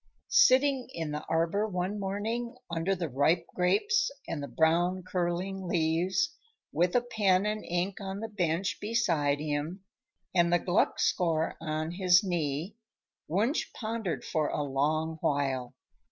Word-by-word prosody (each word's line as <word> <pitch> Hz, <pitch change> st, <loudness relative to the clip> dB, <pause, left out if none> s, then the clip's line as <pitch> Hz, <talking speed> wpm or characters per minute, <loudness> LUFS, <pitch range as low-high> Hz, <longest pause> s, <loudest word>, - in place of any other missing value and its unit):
Sitting 275 Hz, -, +4 dB
in 160 Hz, -2 st, -3 dB
the 150 Hz, 0 st, -4 dB
arbor 165 Hz, +6 st, +1 dB
one 190 Hz, +1 st, -2 dB
morning, 220 Hz, +5 st, -3 dB, 0.2 s
under 170 Hz, +4 st, 0 dB
the 175 Hz, -2 st, -3 dB
ripe 155 Hz, +5 st, +2 dB
grapes 415 Hz, -, +2 dB, 0.2 s
and 145 Hz, -, -3 dB
the 140 Hz, -, -4 dB
brown, 175 Hz, +4 st, +2 dB
curling 185 Hz, +1 st, -2 dB
leaves, 175 Hz, -, +1 dB, 0.4 s
with 175 Hz, +3 st, +1 dB
a 245 Hz, -, +5 dB
pen 205 Hz, -5 st, +2 dB
and 210 Hz, 0 st, -2 dB
ink 175 Hz, +3 st, -2 dB
on 195 Hz, 0 st, -4 dB
the 225 Hz, -, -4 dB
bench 180 Hz, -3 st, -1 dB
beside 170 Hz, -10 st, +1 dB
him 155 Hz, +5 st, -3 dB, 0.5 s
and 170 Hz, -2 st, +3 dB
the 175 Hz, -, +5 dB
Gluck 175 Hz, +2 st, +1 dB
score 165 Hz, -3 st, +1 dB
on 155 Hz, 0 st, -2 dB
his 180 Hz, 0 st, +4 dB
knee, 170 Hz, +1 st, -2 dB, 0.5 s
Wunsch 215 Hz, -, 0 dB
pondered 220 Hz, -5 st, -3 dB
for 155 Hz, -2 st, 0 dB
a 150 Hz, -, -1 dB
long 155 Hz, +4 st, 0 dB
while. 135 Hz, -4 st, -1 dB
180 Hz, 140 wpm, -29 LUFS, 160-205 Hz, 0.5 s, a